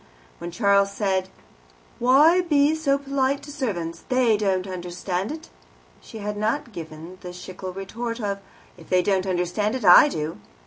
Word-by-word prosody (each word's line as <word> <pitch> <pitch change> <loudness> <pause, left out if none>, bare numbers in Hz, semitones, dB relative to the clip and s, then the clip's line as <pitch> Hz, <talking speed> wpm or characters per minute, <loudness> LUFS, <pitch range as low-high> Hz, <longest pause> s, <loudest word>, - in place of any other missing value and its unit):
When 170 - -5
Charles 200 +1 +2
said, 190 -2 -1 0.7
"Why 295 +9 +5
be 300 -3 +3
so 300 -3 +1
polite 275 0 -1
to 290 - -9
servants? 195 - -4
they 255 -3 +3
don't 190 -3 0
understand 180 +2 -4
it," 320 +1 -9 0.5
she 225 - -11
had 210 0 -4
not 225 +4 -1
given 165 +2 -9
the 180 - -7
Schlegel 185 +1 -8
retort 230 +5 -5
of, 200 -3 -2 0.4
"If 165 - -15
they 180 -1 +3
don't 190 0 +1
understand 185 +5 -1
it, 250 -5 -4
I 180 +11 +9
do." 155 - -4
200 Hz, 160 wpm, -24 LUFS, 180-260 Hz, 0.7 s, I